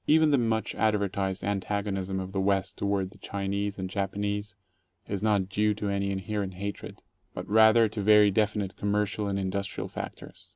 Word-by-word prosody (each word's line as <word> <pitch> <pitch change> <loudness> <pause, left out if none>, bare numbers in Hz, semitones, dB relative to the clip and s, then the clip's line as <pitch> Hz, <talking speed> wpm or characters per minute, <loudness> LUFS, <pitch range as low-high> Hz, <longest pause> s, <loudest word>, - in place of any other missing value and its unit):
Even 155 0 +5
the 140 - +4
much 115 -2 0
advertised 100 -3 0
antagonism 100 -1 -2
of 95 0 -5
the 95 -1 -1
West 95 -1 0
toward 100 -2 -1
the - - -17
Chi 100 -1 -4
nese 100 0 -2
and 95 -1 -3
Japanese 100 +2 -3 0.5
is 100 -2 -3
not 105 -3 +2
due 105 +2 +1
to 105 0 -3
any 100 0 0
inherent 95 0 -3
hatred, 100 +2 -6 0.3
but - - -5
rather 110 +1 +6
to 105 0 -4
very 105 0 +6
definite 105 -1 0
commercial 105 0 -1
and 100 -1 -1
industrial 100 +1 -3
factors. - - -8
100 Hz, 170 wpm, -28 LUFS, 95-105 Hz, 0.5 s, rather